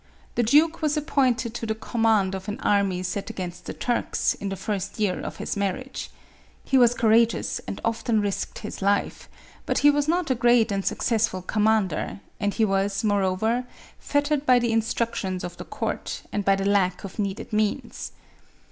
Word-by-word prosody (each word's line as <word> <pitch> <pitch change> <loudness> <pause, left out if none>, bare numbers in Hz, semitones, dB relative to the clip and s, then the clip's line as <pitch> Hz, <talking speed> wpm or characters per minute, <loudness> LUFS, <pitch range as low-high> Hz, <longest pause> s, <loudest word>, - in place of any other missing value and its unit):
The - - +1
duke 305 +9 +4
was 305 -1 +1
appointed 255 -6 +1
to 235 -1 -4
the 220 - -1
com 225 +1 -4
mand 210 -4 +3
of 190 +1 -6
an 210 - -4
army 195 -3 +1
sent 195 +3 -3
against 180 -4 -6
the - - -5
Turks, 240 -1 0
in 200 - -5
the 195 - -3
first 200 0 -4
year 200 -4 +1
of - - -5
his - - -3
marriage. 200 +6 -3 0.5
He 270 - -1
was 245 -2 +6
courageous, 230 0 +2
and - - -5
often 230 0 +1
risked 205 -2 -2
his 210 - -7
life; 200 +1 0 0.4
but - - +1
he 290 - +9
was 290 0 0
not 340 -2 +1
a - - +5
great 240 -2 +3
and 195 -1 -1
successful 220 -6 0
commander, 210 -3 +1 0.2
and 205 0 0
he 225 - +3
was, 195 0 0
moreover, 205 +4 +1 0.3
fettered 285 0 0
by 255 -3 +5
the 240 -1 +1
in 225 0 +3
structions 215 -5 -2
of 175 - -6
the - - -7
court, - - -4
and 205 - 0
by 195 0 +4
the 195 0 -2
lack 195 -3 +2
of 195 +3 -8
needed 205 +3 -3
means. 215 -1 -1
215 Hz, 185 wpm, -25 LUFS, 195-240 Hz, 0.5 s, he